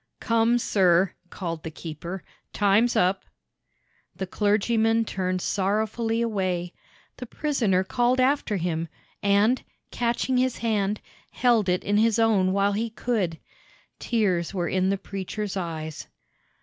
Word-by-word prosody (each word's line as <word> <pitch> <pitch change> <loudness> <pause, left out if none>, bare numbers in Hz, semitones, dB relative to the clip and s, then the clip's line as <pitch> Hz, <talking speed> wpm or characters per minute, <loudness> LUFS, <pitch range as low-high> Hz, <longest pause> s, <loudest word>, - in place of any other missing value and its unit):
"Come, 230 +1 +2
sir," 185 -5 +3 0.2
called 170 -4 -5
the 160 - -6
keeper. 165 +3 -7 0.3
"Time's 210 +4 +3
up." 185 +2 +2 0.9
The 190 - -3
clergyman 220 +3 +2
turned 185 -2 -2
sorrowfully 220 +4 0
away. 185 -5 -2 0.4
The 250 - -7
prisoner 225 -11 0
called 245 +5 +1
after 255 -5 +2
him, 165 -2 -2 0.3
and, 205 +5 +3 0.3
catching 240 +2 0
his 255 0 +1
hand, 210 -3 0 0.3
held 235 -6 +2
it 180 0 +1
in 205 +1 +1
his 225 0 +3
own 210 -5 +3
while 200 +1 +2
he 220 +3 -1
could. 215 -7 -1 0.6
Tears 195 -7 0
were 175 -2 -1
in 185 +1 +1
the 195 - +1
preacher's 195 +1 -5
eyes. 160 -4 -5
200 Hz, 125 wpm, -25 LUFS, 185-230 Hz, 0.9 s, sir